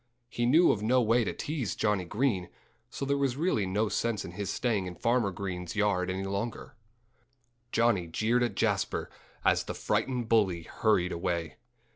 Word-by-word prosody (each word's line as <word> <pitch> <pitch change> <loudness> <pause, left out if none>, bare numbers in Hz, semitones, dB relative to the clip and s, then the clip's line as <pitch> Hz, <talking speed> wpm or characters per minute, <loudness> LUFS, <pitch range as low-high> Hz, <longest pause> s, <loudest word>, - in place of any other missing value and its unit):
He 120 0 -1
knew 160 +7 +6
of 105 - -1
no 125 +4 +3
way 115 0 +3
to - - -1
tease 145 -9 -3
Johnnie 105 -4 0
Green; 105 -3 0 0.4
so 140 - -4
there 140 +1 0
was 135 -2 0
really 145 - +1
no 105 +4 +1
sense 115 0 -1
in - - -7
his 100 +2 -4
staying 105 -4 0
in 90 - -7
Farmer 115 +2 +1
Green's 90 -1 -5
yard 100 -3 +1
any 95 +1 -2
longer. 100 +4 -4 1.0
Johnnie 115 -7 +2
jeered 110 +8 +1
at 120 - 0
Jasper - - 0 0.3
as - - +3
the - - -5
frightened 125 -3 -1
bully 95 -7 +2
hurried 95 -2 +1
away. 85 0 -2
105 Hz, 170 wpm, -29 LUFS, 95-120 Hz, 1.0 s, knew